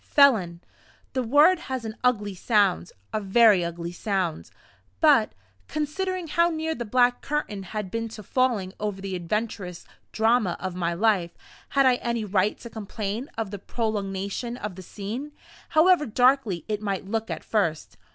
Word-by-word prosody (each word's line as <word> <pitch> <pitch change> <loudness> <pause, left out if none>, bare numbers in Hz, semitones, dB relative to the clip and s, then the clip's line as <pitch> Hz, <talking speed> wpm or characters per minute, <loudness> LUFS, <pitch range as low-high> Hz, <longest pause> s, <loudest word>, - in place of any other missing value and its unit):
Felon! 205 - +4 0.5
The 260 - 0
word 295 +9 +5
has 260 -7 -5
an 220 -1 -5
ugly 210 -5 +1
sound 200 - +1 0.2
a 215 - 0
very 205 -2 +5
ugly 170 0 -4
sound. 185 -3 -2 0.5
But, 290 -9 +5 0.3
considering 350 +4 -2
how 340 +2 +3
near 320 -1 -2
the 240 -5 -5
black 245 +2 +3
curtain 280 -9 -3
had 195 0 -5
been 230 0 -3
to 215 - -9
falling 220 -5 0
over 205 -2 -3
the 195 -1 -4
adventurous 180 0 -3 0.3
drama 220 -4 +2
of 185 -1 -4
my 170 -1 -1
life, 190 -3 +1 0.3
had 275 -1 +3
I 255 -1 +5
any 235 -3 -2
right 200 +1 +1
to 235 - -8
complain 215 +3 -4
of 220 -4 -3
the 205 - -6
prolongation 205 +2 -3
of 210 -4 -5
the 185 - -10
scene, 220 - -6 0.4
however 325 -1 +4
darkly 245 - +2
it 210 -1 -2
might 195 -3 -2
look 225 +2 -2
at - - -4
first? 170 -8 -1
215 Hz, 160 wpm, -25 LUFS, 195-250 Hz, 0.5 s, word